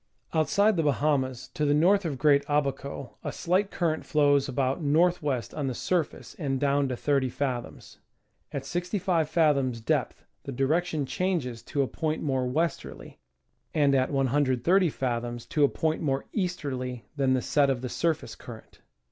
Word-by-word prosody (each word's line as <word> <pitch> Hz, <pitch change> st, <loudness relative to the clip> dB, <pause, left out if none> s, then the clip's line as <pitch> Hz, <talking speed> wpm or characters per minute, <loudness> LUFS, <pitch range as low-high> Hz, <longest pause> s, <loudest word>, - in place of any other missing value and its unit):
Outside 195 Hz, +7 st, +3 dB
the -, -, +3 dB
Bahamas, 140 Hz, -4 st, 0 dB
to 155 Hz, -, -3 dB
the 145 Hz, 0 st, +3 dB
north 185 Hz, +5 st, +4 dB
of 145 Hz, -5 st, -2 dB
Great 145 Hz, 0 st, +4 dB
Abaco, 140 Hz, -2 st, -2 dB
a -, -, -3 dB
slight 185 Hz, +3 st, 0 dB
cur 170 Hz, -5 st, 0 dB
rent 155 Hz, -, -4 dB
flows 145 Hz, -2 st, +2 dB
about 130 Hz, +2 st, 0 dB
N. 145 Hz, -3 st, 0 dB
W. 155 Hz, -6 st, +2 dB
on 145 Hz, -3 st, -2 dB
the 130 Hz, -, -2 dB
surface 175 Hz, +3 st, -2 dB
and 135 Hz, -4 st, -1 dB
down 140 Hz, 0 st, +2 dB
to 125 Hz, -2 st, -3 dB
30 135 Hz, -2 st, +1 dB
fathoms; 125 Hz, -2 st, -4 dB, 0.5 s
at 135 Hz, -1 st, -4 dB
65 175 Hz, -1 st, -1 dB
fathoms 140 Hz, -8 st, +2 dB
depth 110 Hz, -, -1 dB, 0.2 s
the -, -, -7 dB
direction 150 Hz, +3 st, 0 dB
changes 130 Hz, -5 st, -2 dB
to 140 Hz, -2 st, -1 dB
a -, -, -2 dB
point 155 Hz, +2 st, -2 dB
more 130 Hz, -4 st, 0 dB
west 160 Hz, +6 st, 0 dB
erly, -, -, -11 dB, 0.6 s
and 145 Hz, -3 st, +4 dB
at 130 Hz, -1 st, +2 dB
130 140 Hz, +6 st, +2 dB
fathoms 120 Hz, -3 st, -3 dB
to 150 Hz, -, +1 dB
a 140 Hz, -, +5 dB
point 160 Hz, 0 st, -1 dB
more 135 Hz, -3 st, -1 dB
easterly 130 Hz, -, -3 dB
than 135 Hz, -2 st, +2 dB
the 130 Hz, -, 0 dB
set 145 Hz, -2 st, +3 dB
of 130 Hz, -3 st, 0 dB
the -, -, -2 dB
surface 160 Hz, +5 st, -1 dB
current. -, -, -12 dB
145 Hz, 170 wpm, -27 LUFS, 130-160 Hz, 0.6 s, a